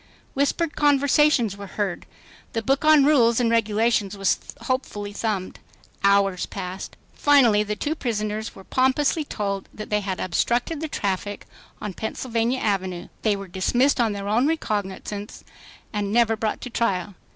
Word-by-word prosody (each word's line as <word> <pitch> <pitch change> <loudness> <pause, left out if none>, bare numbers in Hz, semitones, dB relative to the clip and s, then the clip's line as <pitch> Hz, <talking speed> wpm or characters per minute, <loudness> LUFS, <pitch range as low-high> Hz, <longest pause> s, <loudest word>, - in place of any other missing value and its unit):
Whispered 295 +4 0
conversations 285 -5 +3
were 200 0 -8
heard. 200 -4 -2 0.5
The 225 - -2
book 270 +5 +1
on 305 -2 +6
rules 240 -6 +4
and 235 -2 +2
regulations 220 -2 +1
was 195 -1 +1 0.2
hopefully 205 -6 -3
thumbed. 205 -4 -3 0.4
Hours 200 -2 +3
passed. 185 -1 -6 0.2
Finally 255 -8 +5
the 210 0 -2
two 290 +8 -2
prisoners 215 -5 -3
were 195 - -12
pompously 265 - +1
told 200 -7 -4
that 215 0 -9
they 210 - +3
had 190 -2 -3
"obstructed 240 - 0
the 320 - -2
traffic" 205 -6 -3 0.3
on 210 - -5
Pennsylvania 230 +4 -2
Avenue, 185 -4 -2
were 200 -3 0
dismissed 245 +9 +2
on 225 -3 +1
their 200 0 -5
own 230 +7 +2
recognizance, 205 -7 -3 0.5
and 205 -1 -2
never 230 0 +3
brought 215 0 -2
to 250 - -7
trial. 200 -4 -1
215 Hz, 145 wpm, -24 LUFS, 200-255 Hz, 0.5 s, on